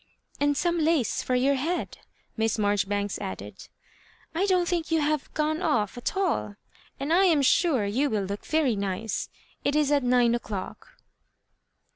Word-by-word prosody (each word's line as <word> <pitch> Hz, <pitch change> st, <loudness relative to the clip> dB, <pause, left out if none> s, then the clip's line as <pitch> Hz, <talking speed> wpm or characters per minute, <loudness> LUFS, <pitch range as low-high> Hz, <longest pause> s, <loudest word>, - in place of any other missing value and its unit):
"And 290 Hz, 0 st, +2 dB
some 345 Hz, +1 st, +1 dB
lace 315 Hz, -6 st, +1 dB
for 255 Hz, -, -1 dB
your 265 Hz, +3 st, +3 dB
head," 315 Hz, +7 st, -2 dB, 0.4 s
Miss 225 Hz, 0 st, 0 dB
Marjoribanks 205 Hz, -1 st, 0 dB
added. 95 Hz, +2 st, -7 dB, 0.3 s
" -, -, -30 dB
I 370 Hz, +5 st, +1 dB
don't 365 Hz, -2 st, +2 dB
think 345 Hz, -2 st, -1 dB
you 325 Hz, -1 st, +2 dB
have 300 Hz, -1 st, -1 dB
gone 310 Hz, +2 st, 0 dB
off 215 Hz, -, 0 dB
at 245 Hz, +9 st, -3 dB
all, 365 Hz, -, 0 dB, 0.4 s
and 285 Hz, +4 st, -1 dB
I 380 Hz, +3 st, +5 dB
am 315 Hz, -6 st, +4 dB
sure 270 Hz, -, +3 dB
you 255 Hz, +9 st, 0 dB
will 210 Hz, -4 st, 0 dB
look 200 Hz, +2 st, -5 dB
very 305 Hz, -7 st, +1 dB
nice. 200 Hz, +2 st, -3 dB, 0.3 s
It 285 Hz, -, +1 dB
is 300 Hz, -1 st, +2 dB
at 290 Hz, -1 st, +3 dB
nine 245 Hz, -2 st, +3 dB
o'clock." 235 Hz, -, -5 dB
275 Hz, 165 wpm, -26 LUFS, 210-320 Hz, 0.4 s, I